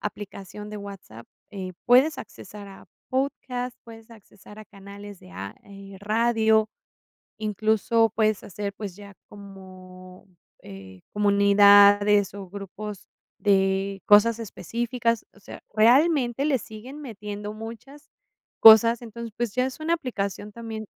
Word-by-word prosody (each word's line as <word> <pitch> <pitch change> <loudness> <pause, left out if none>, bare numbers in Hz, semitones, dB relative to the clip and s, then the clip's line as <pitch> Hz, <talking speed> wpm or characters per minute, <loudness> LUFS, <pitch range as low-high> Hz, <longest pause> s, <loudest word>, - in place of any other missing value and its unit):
aplicación 205 0 -8
de 210 - -7
WhatsApp, 195 - -11 0.2
eh, 190 -3 -7
puedes 260 +5 +4
accesar 205 -1 -11
a 195 - -14 0.2
pódcast, 255 -2 -3
puedes 225 0 -14
accesar 210 -1 -16
a 215 - -10
canales 200 0 -12
de - - -16
a 100 +2 -7
eh, 195 -1 -12
radio, 220 0 +2 0.7
incluso 220 +1 +1
puedes 215 -2 +1
hacer, 200 +1 -6
pues 200 -3 -8
ya 200 -1 -13 0.2
como 185 -2 -14 0.3
eh, 95 -2 -12
comunidades 205 0 +5
o 195 -2 -9
grupos 200 +1 -9 0.3
de 195 -1 0
cosas 210 +2 +5
específicas, 230 +2 -3
o - - -21
sea, 200 - -11
realmente 255 +3 +3
le 275 -4 +1
siguen 245 +8 -11
metiendo 210 -4 -7
muchas 230 +6 -11 0.5
cosas, 225 +2 +8
entonces, 235 0 -8
pues 240 -3 -3
ya 255 0 +1
es 260 +3 -6
una 320 +2 0
aplicación 205 - -5
también 220 -1 -7
210 Hz, 125 wpm, -24 LUFS, 200-230 Hz, 0.7 s, cosas